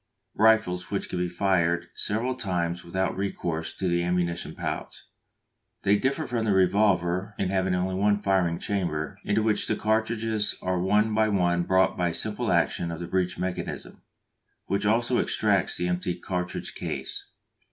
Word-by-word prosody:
_ - - -52 0.4
rifles 105 -5 +3
which 100 - -2
can 90 - -3
be 90 0 0
fired 85 -2 +1
several 115 +5 -1
times 90 -7 -2
without 95 +2 -1
recourse 85 -4 -2
to 95 - -3
the 85 0 +2
ammunition 85 -1 -1
pouch. - - -5 0.8
They 100 +1 +4
differ 135 +8 0
from 120 -4 -1
the 105 -2 +2
revolver 95 0 +2
in 95 - 0
having 95 -1 +1
only 90 +1 -1
one 100 +2 +2
firing 95 -4 +1
chamber, 95 -2 -2
into 105 +1 +1
which 110 -1 +2
the - - +1
cartridges 110 0 0
are 90 -1 -1
one 105 +4 +2
by 110 0 +3
one 90 -3 +2
brought 95 0 +3
by 90 -1 +2
a - - -4
simple 110 +4 -1
action 85 0 +1
of 85 -1 -5
the 85 - -4
breech 90 -1 0
mechanism, 90 -1 -4 0.6
which 100 +1 0
also 115 +3 +2
extracts - - +1
the 90 - -1
empty 90 0 -1
cartridge 90 0 -4
case. - - -5
95 Hz, 165 wpm, -26 LUFS, 90-105 Hz, 0.8 s, They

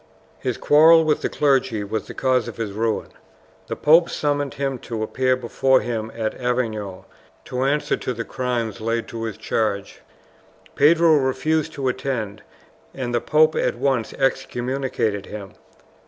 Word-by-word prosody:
His - - -2
quarrel 160 +2 +6
with 155 -1 +1
the - - -1
clergy 130 -7 +1
was 105 +2 -4
the - - -9
cause 130 -3 +1
of - - -8
his 115 -3 -3
ruin. 110 +2 -1 0.6
The - - -3
pope 165 +3 +5
summoned 145 -2 -1
him 135 -2 -2
to 115 -2 -4
appear 130 +3 +1
before 130 +2 +2
him 115 -2 -3
at 110 -1 -2
Avignon 110 -6 -2 0.4
to 130 +1 -2
answer 145 +2 +1
to - - -4
the 115 -1 -4
crimes 120 -4 -3
laid 115 +1 -1
to 115 -1 -5
his 110 - -5
charge. 100 -3 -2 0.7
Pedro 160 +2 +5
refused 145 +4 0
to 135 -3 -3
attend, 125 -5 -3 0.5
and 125 -2 -3
the 120 - +1
pope 155 +4 +4
at - - 0
once 130 -5 0
excommunicated 130 -5 -1
him. 100 -2 -8
125 Hz, 155 wpm, -22 LUFS, 115-140 Hz, 0.7 s, quarrel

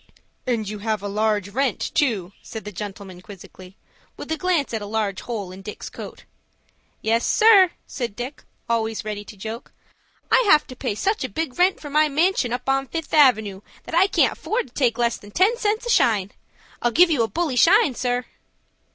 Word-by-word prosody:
"And 230 -4 -1
you 210 +1 -5
have 215 -1 -2
a - - -3
large 210 -1 0
rent 255 +2 -1
too," 225 - 0
said 220 -2 -8
the 210 - -6
gentleman 195 -2 -8
quizzically, 185 -1 -13 0.4
with - - -8
a - - +2
glance 320 -5 0
at 220 - -2
a 205 - -6
large 205 -2 -2
hole 210 -6 -5
in 190 +1 -10
Dick's 210 +2 -8
coat. - - -9 0.8
"Yes, 230 +1 +1
sir," 420 -5 +6 0.2
said 240 -6 -5
Dick, 250 +5 -7 0.2
always 225 -2 -1
ready 210 -1 -4
to 210 - -13
joke; 220 +5 -7 0.6
"I - - +6
have 305 -5 +6
to 255 - -11
pay 210 - -3
such 405 - -1
a 260 - -3
big 295 - -4
rent 370 +2 +3
for 290 - -9
my 305 +1 +3
manshun 305 -4 +1
up 250 +1 -4
on 270 0 +1
Fifth 325 +1 -6
Avenoo, 220 -10 +4 0.2
that - - -10
I 355 +4 +5
can't - - +2
afford 440 - -3
to - - -32
take 245 -4 +1
less 235 -1 +1
than 205 - -14
ten 380 - +3
cents 440 0 -1
a - - -4
shine. 205 - +2 0.5
I'll 240 - +2
give 340 +8 +5
you 285 -7 +2
a 225 - +2
bully 295 - -2
shine, 345 - +5
sir." 245 0 -1
240 Hz, 200 wpm, -22 LUFS, 210-310 Hz, 0.8 s, sir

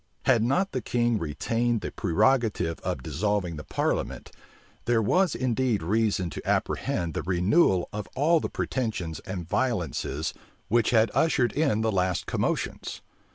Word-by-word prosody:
Had 125 -4 +4
not 180 - +1
the 130 - -2
king 120 -1 +1
still - - -6
retained 115 +10 0
the - - -4
prerogative 100 -3 +1
of 60 - -3
dissolving 100 -1 -1
the 75 - -7
parliament, - - -2 0.5
there 120 -1 +3
was 180 - +2
indeed 125 -5 0
reason 100 -2 +1
to - - -6
apprehend 85 -2 0
the - - -2
renewal 95 - +2
of 105 0 -4
all 160 +5 +4
the - - -3
pretensions 105 - -3
and 90 -3 -5
violences 90 - -1 0.4
which 115 +2 +3
had 115 -1 +3
ushered 130 -7 +2
in 140 -8 +1
the 110 0 +1
last 90 -2 0
commotions. - - -2
110 Hz, 150 wpm, -27 LUFS, 90-125 Hz, 0.5 s, Had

